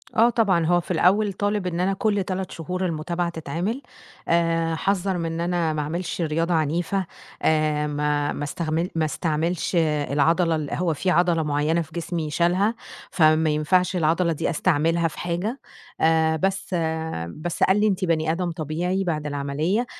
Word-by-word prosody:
آه 230 Hz, +2 st, +5 dB
طبعًا، 200 Hz, -8 st, +2 dB
هو 175 Hz, +2 st, +3 dB
في -, -, -7 dB
الأول 200 Hz, +2 st, +3 dB
طالب 205 Hz, 0 st, -1 dB
إن 170 Hz, -1 st, -2 dB
أنا 190 Hz, +2 st, +1 dB
كلّ 205 Hz, 0 st, 0 dB
3 185 Hz, 0 st, -4 dB
شهور 180 Hz, +3 st, -3 dB
المتابعة 170 Hz, +1 st, -2 dB
تتعمل، 170 Hz, -, -3 dB, 0.5 s
آآ 165 Hz, -1 st, +1 dB
حذَّر 195 Hz, +1 st, 0 dB
من 170 Hz, -, -2 dB
إن 165 Hz, -, -3 dB
أنا 170 Hz, -2 st, 0 dB
ما 150 Hz, -, -1 dB
أعملش 170 Hz, +4 st, -3 dB
رياضة 165 Hz, +2 st, 0 dB
عنيفة، 170 Hz, +4 st, 0 dB, 0.4 s
آآ 155 Hz, -1 st, +2 dB
ما 145 Hz, 0 st, 0 dB
ما -, -, -4 dB
استغمل 160 Hz, +3 st, -2 dB
ما 160 Hz, -1 st, +1 dB
استعملش 165 Hz, +3 st, -1 dB
العضلة 160 Hz, +1 st, +2 dB
ال 150 Hz, -2 st, -4 dB
هو 170 Hz, -2 st, 0 dB
فيه 180 Hz, +5 st, 0 dB
عضلة 175 Hz, -2 st, +3 dB
معيّنة 150 Hz, +3 st, +1 dB
في 155 Hz, -, -9 dB
جسمي 170 Hz, -2 st, -3 dB
شالها، 180 Hz, +8 st, +2 dB, 0.4 s
فما 155 Hz, -2 st, +4 dB
ينفعش 180 Hz, +5 st, +2 dB
العضلة 170 Hz, +1 st, +2 dB
دي 150 Hz, -, -2 dB
أستعملها 165 Hz, 0 st, +1 dB
في 160 Hz, -, -9 dB
حاجة، 180 Hz, +9 st, -2 dB, 0.4 s
آآ 160 Hz, 0 st, +3 dB
بس 195 Hz, +3 st, -2 dB, 0.5 s
بس 155 Hz, -, -3 dB
قال 190 Hz, +2 st, +4 dB
لي 215 Hz, -, +3 dB
أنتِ 190 Hz, -1 st, 0 dB
بني 160 Hz, -1 st, +1 dB
آدم 175 Hz, +1 st, -1 dB
طبيعي 170 Hz, +4 st, -2 dB
بعد 155 Hz, -4 st, -2 dB
العمليّة، 150 Hz, -, -1 dB
170 Hz, 165 wpm, -24 LUFS, 155-185 Hz, 0.5 s, آه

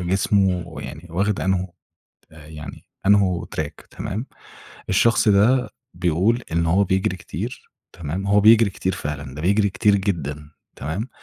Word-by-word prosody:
جسمه 95 Hz, 0 st, +1 dB, 0.2 s
يعني 80 Hz, +4 st, -9 dB
واخِد 100 Hz, +4 st, 0 dB
أنْهو 95 Hz, -1 st, -1 dB, 0.6 s
آآ 80 Hz, -1 st, -14 dB
يعني 75 Hz, -2 st, -10 dB, 0.2 s
أنْه 95 Hz, -4 st, +3 dB
تراك 75 Hz, -2 st, -5 dB
تمام، 110 Hz, +7 st, -5 dB, 0.6 s
الشخص 115 Hz, +3 st, +3 dB
ده 110 Hz, +3 st, +4 dB, 0.2 s
بيقول 90 Hz, +8 st, +1 dB
إن 85 Hz, 0 st, +1 dB
هو 95 Hz, +5 st, +3 dB
بيجري 95 Hz, -1 st, 0 dB
كتير 105 Hz, -, -7 dB, 0.2 s
تمام، 85 Hz, +4 st, -5 dB
هو 100 Hz, +1 st, +4 dB
بيجري 110 Hz, -1 st, +6 dB
كتير 95 Hz, 0 st, -2 dB
فعلًا 70 Hz, -4 st, -5 dB
ده 75 Hz, -, -7 dB
بيجري 100 Hz, +2 st, +2 dB
كتير 105 Hz, +1 st, +3 dB
جدًا 75 Hz, -7 st, -3 dB, 0.3 s
تمام؟ 95 Hz, -, -4 dB
95 Hz, 140 wpm, -22 LUFS, 80-100 Hz, 0.6 s, بيجري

